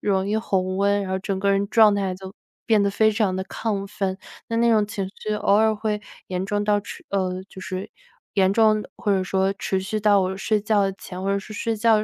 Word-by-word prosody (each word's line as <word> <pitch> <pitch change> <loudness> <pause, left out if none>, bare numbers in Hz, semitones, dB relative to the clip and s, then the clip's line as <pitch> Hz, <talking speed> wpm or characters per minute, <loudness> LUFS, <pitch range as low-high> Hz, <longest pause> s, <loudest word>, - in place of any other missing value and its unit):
容 195 -2 +1
易 210 - -1
红 185 -3 -1
温， 200 0 +2
然 190 - -5
后 190 - 0
整 195 0 -3
个 200 +1 +1
人 200 0 +1
状 220 -3 +6
态 195 -2 -1
就 190 +1 -9 0.3
变 220 -3 +3
得 200 - +2
非 220 +1 +3
常 205 -4 +1
地 190 - -3
亢 200 -1 -3
奋。 195 -1 -2 0.3
那 230 - -1
那 235 0 +3
种 215 -2 +3
情 205 -2 -3
绪 215 0 -2
偶 205 - +1
尔 220 +1 +4
会 210 -1 -2 0.3
严 185 +1 -2
重 205 0 -1
到 205 0 +2
持 - - -10
呃， 185 -2 -1
就 190 - -11
是 185 +1 -5 0.5
严 190 -1 +3
重 215 -1 +4 0.2
或 205 - 0
者 190 - +2
说 190 +1 +1
持 190 -1 -1
续 215 +3 -2
到 205 -1 +4
我 190 0 -1
睡 210 +2 0
觉 205 -2 +2
前 185 -1 -9
或 195 - -2
者 200 - +1
是 200 +2 -9
睡 225 +2 -2
觉 225 0 +4
200 Hz, 255 characters per minute, -23 LUFS, 190-215 Hz, 0.5 s, 状